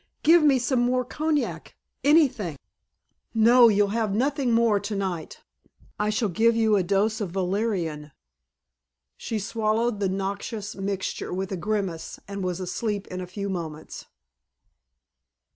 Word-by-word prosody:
"Give 335 +2 +6
me 290 -3 +5
some 250 +1 0
more 250 +1 +1
cognac 300 +2 -2 0.3
anything." 260 - +3 0.8
"You'll 225 -3 +6
have 215 -2 -1
nothing 270 +1 +1
more 230 -3 +3
tonight. 195 -5 -4 0.6
I 210 0 +1
shall 215 +1 0
give 225 +5 +2
you 220 -2 +3
a 195 - +3
dose 205 +5 0
of 200 - -2
valerian." 180 -5 -2 1.0
She 225 - -4
swallowed 220 +1 0
the 195 -2 0
noxious 200 +2 -4
mixture 195 -1 -3
with 190 +1 -3
a - - -1
grimace 190 -3 -3
and 200 -1 -5
was 180 -1 -2
asleep 200 +2 -3
in 185 0 -5
a 180 - -6
few 200 +2 -5
moments. 160 -5 -6
205 Hz, 130 wpm, -25 LUFS, 190-230 Hz, 1.0 s, Give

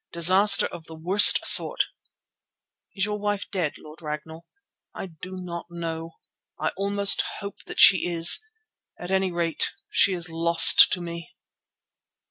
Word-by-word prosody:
"Disaster 185 +5 +4
of 160 - -10
the 160 - -12
worst 180 +6 +3
sort." - - +5 1.1
"Is 190 -1 -2
your 210 0 -6
wife 205 -1 -4
dead, 180 -7 -4
Lord 155 +2 -16
Ragnall?" 160 +2 -9 0.5
"I - - -8
do 180 +2 -12
not 170 -2 -9
know. 165 -1 -8 0.5
I - - -2
almost 200 0 0 0.2
hope 200 0 -10
that - - -11
she 185 -2 +5
is. 170 - +3 0.6
At 175 +1 -9
any 190 -1 -1
rate 170 -2 -3 0.2
she 195 - +1
is 175 -1 -3
lost 165 0 +4
to 180 - -4
me." 170 -1 -10
175 Hz, 140 wpm, -22 LUFS, 165-195 Hz, 1.1 s, sort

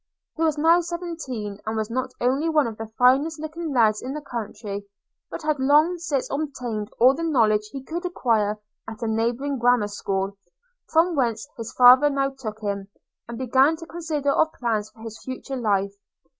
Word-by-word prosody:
– - - -65
He 325 - -6
was 315 -2 +2
now 330 +3 +5
seventeen, 325 - -5
and 220 +1 -3
was 220 +1 -2
not 255 +2 -1
only 270 +6 +1
one 305 -3 +3
of 225 - -4
the 225 - -6
finest 275 +6 +3
looking 315 +1 -5
lads 220 -5 +3
in 260 +3 -5
that 300 -1 -7
country, 210 -4 -6 0.4
but - - -7
had 305 -2 0
long 300 +6 +4
since 295 -6 -1
obtained 250 -8 -3
all 255 +3 +6
the 290 - -5
knowledge 220 -10 +2
he 275 -2 -7
could 335 +6 -5
acquire 225 - 0 0.3
at 220 +1 -7
a - - 0
neighbouring 240 +5 -1
grammar 240 -3 +3
school; 195 -1 -2 0.5
from 335 +2 +3
whence 235 -3 0
his 230 -2 -6
father 255 +3 +7
now 275 -1 0
took 220 -5 -7
him, 200 -2 -3 0.4
and 235 0 -6
began 260 +5 +3
to 330 +1 -10
consider 315 -4 -2
of 315 +2 +2
plans 220 -4 -1
for 225 - -19
his 225 -1 -8
future 260 +1 -6
life. 200 -5 0
255 Hz, 185 wpm, -24 LUFS, 220-300 Hz, 0.5 s, father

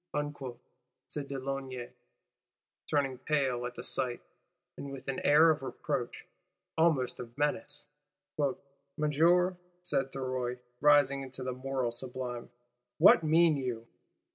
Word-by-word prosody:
_' 145 -4 -4 0.5
said 145 -2 -4
de 140 - -4
Launay, 130 -2 -4 1.0
turning 135 -4 0
pale 130 -4 0
at 125 - -9
the 120 - -7
sight, 125 -2 -1 0.6
with 135 -1 -8
an 135 -1 -2
air 155 +3 +6
of 150 - -1
reproach, 135 -1 -4 0.5
almost 160 -6 +2
of 120 0 -9
menace. 145 0 -1 1.1
'Monsieur,' 170 +5 +3 0.3
said 135 -6 0
Thuriot, 130 -2 -2 0.2
rising 145 -2 +5
into 130 -1 -7
the 130 0 -2
moral 130 -1 -2
sublime, 125 0 -4 0.5
'What - - +8
mean 160 0 +4
_you? 125 -4 -3
135 Hz, 115 wpm, -31 LUFS, 125-150 Hz, 1.1 s, What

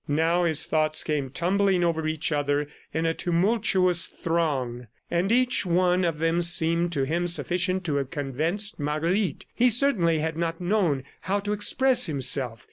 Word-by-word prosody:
Now 165 +4 +1
his 160 -2 +1
thoughts 155 0 0
came 145 -3 -2
tumbling 185 +6 +1
over 160 -2 0
each 155 0 -2
other 145 0 0 0.3
in 160 +1 -2
a 165 - +1
tumultuous 180 -1 +1
throng, 135 -8 -2 0.2
and 180 +4 0
each 250 +1 +2
one 180 0 +2
of 165 -3 -1
them 165 +2 +1
seemed 170 0 +2
to 140 -4 0
him 170 +6 -1
sufficient 185 +2 0
to 150 -5 -1
have 135 -2 -2
convinced 160 - -2
Marguerite. 155 +4 -1
He 250 +1 +3
certainly 215 - +3
had 160 +1 -2
not 165 0 -2
known 175 -7 0 0.2
how 200 +2 -1
to 205 +1 -2
express 250 +4 +1
himself. 130 -5 0
170 Hz, 160 wpm, -25 LUFS, 150-185 Hz, 0.3 s, He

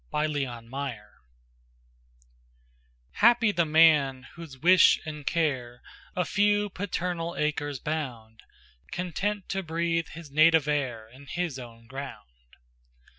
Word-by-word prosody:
Y 150 0 +1
Z 145 -2 -1
Solitude 125 +1 -6 2.1
HAPPY 235 0 +4
the 170 -4 +1
man, 150 -5 +4
whose 165 -6 -10
wish 180 +5 +6
and 150 -2 -7
care 130 -8 -1 0.3
A 180 - 0
few 205 +2 +2
paternal 175 -3 -3
acres 145 -1 -1
bound, 120 -8 -5 0.5
Content 185 +3 -3
to 195 - -1
breathe 165 -1 -1
his 160 -2 -11
native 155 0 +5
air 130 -7 -2
In 130 +5 -16
his 170 -4 -3
own 115 -2 -12
ground. 115 - -10
150 Hz, 115 wpm, -27 LUFS, 130-170 Hz, 2.1 s, wish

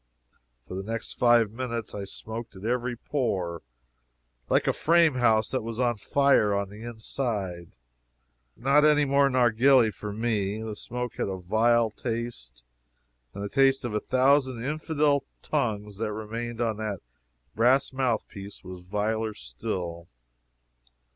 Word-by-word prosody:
For - - -8
the 95 - -3
next 115 +3 -4
five 120 -3 +4
minutes 120 -1 -4
I 100 -1 -5
smoked 110 +2 -7
at 95 +2 -9
every 125 +1 -1
pore, 95 - -2 0.9
like - - +3
a - - +2
frame 165 -1 +4
house 115 -4 +2
that 130 - 0
is 115 +1 -5
on 120 -2 +1
fire 130 -3 +3
on 100 -1 -1
the 105 +1 -11
inside. 110 -6 -4 0.8
Not 140 +5 +4
any 150 -1 +5
more 140 0 +4
narghili 125 -1 +4
for 105 - -6
me. 105 -2 -1
The 110 -1 -5
smoke 125 +3 -5
had - - -1
a 95 - -3
vile 110 +5 +2
taste, 115 - -5 0.7
and 100 - -5
the - - -2
taste 135 0 +3
of 120 - -3
a 105 - +1
thousand 130 -1 +2
infidel 150 -1 +1 0.2
tongues 105 -8 -2
that 110 -1 -1
remained 115 +2 -5
on 110 -3 0
that 105 -3 -4 0.5
brass 130 +5 +3
mouthpiece 110 -6 -3
was 90 -1 -9
viler 105 +3 -1
still. 85 +8 -5
115 Hz, 140 wpm, -27 LUFS, 105-130 Hz, 0.9 s, any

